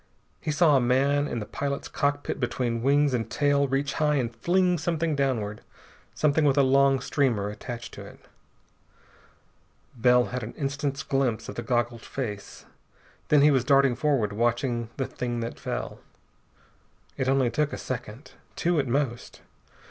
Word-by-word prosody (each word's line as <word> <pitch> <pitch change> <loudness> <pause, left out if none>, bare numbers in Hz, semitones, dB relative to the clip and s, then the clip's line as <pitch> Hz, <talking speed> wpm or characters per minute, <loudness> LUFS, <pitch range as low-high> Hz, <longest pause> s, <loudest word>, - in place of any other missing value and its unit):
He - - -5
saw 155 0 +4
a 135 - +4
man 140 +4 +2
in 120 - -4
the 105 - -4
pilot's 140 +5 -4
cockpit 145 0 -1
between 120 -2 -1
wings 140 +2 +3
and 115 -3 -1
tail 145 -1 +2
reach 135 +1 -1
high 150 -1 +1
and 120 -4 -1
fling 180 +7 +2
something 160 -1 -1
downward, 115 -7 -1 0.5
something 150 +1 +2
with 145 -1 +3
a 140 - +6
long 135 0 +4
streamer 125 -7 0
attached 120 +3 -7
to - - -9
it. - - -14 1.8
Bell 125 +1 +4
had 125 - -2
an 110 +1 -7
instant's 140 0 -3
glimpse 130 -5 -1
of - - -5
the - - -5
goggled 120 -2 -1
face. 110 -7 -6 0.6
Then 150 -2 +5
he 150 - +6
was 130 -4 +2
darting 135 0 +4
forward, 130 -8 0
watching 120 +1 0
the 135 - -1
thing 120 -1 -4
that 115 - -5
fell. - - -4 1.2
It 130 - -2
took - - 0
only 130 -3 +2 0.2
a - - -4
second. 125 +1 -6 0.2
Two 170 -2 +1
at 135 - 0
most. 125 -2 -2
135 Hz, 160 wpm, -26 LUFS, 120-145 Hz, 1.8 s, a